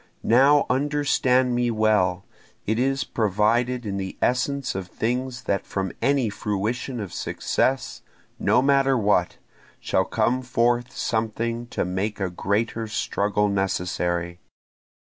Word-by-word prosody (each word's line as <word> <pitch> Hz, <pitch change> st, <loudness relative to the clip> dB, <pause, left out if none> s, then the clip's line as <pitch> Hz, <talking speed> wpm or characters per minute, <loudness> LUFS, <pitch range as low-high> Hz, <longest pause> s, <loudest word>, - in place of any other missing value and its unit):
Now 140 Hz, +5 st, +5 dB
understand 130 Hz, -2 st, +2 dB
me 120 Hz, 0 st, +1 dB
well 105 Hz, -5 st, +1 dB, 0.4 s
it 110 Hz, +2 st, 0 dB
is 135 Hz, +1 st, +1 dB
provided 115 Hz, +4 st, 0 dB
in 100 Hz, -1 st, -3 dB
the 95 Hz, -1 st, -5 dB
essence 135 Hz, +2 st, 0 dB
of 95 Hz, -1 st, -5 dB
things 125 Hz, +5 st, -3 dB
that 100 Hz, -, -1 dB
from 95 Hz, -2 st, -3 dB
any 135 Hz, -4 st, +2 dB
fruition 110 Hz, +5 st, -3 dB
of 100 Hz, -5 st, -6 dB
success, 130 Hz, -1 st, -1 dB, 0.4 s
no 125 Hz, -, +3 dB
matter 135 Hz, -1 st, +3 dB
what, 100 Hz, -5 st, +1 dB, 0.4 s
shall 95 Hz, -, +1 dB
come 120 Hz, +4 st, 0 dB
forth 120 Hz, 0 st, +1 dB
something 115 Hz, +1 st, -2 dB
to -, -, -2 dB
make 95 Hz, +4 st, -2 dB
a 95 Hz, -2 st, -2 dB
greater 110 Hz, +5 st, -1 dB
struggle 105 Hz, -1 st, 0 dB
necessary. 90 Hz, -3 st, -1 dB
115 Hz, 125 wpm, -24 LUFS, 100-125 Hz, 0.4 s, Now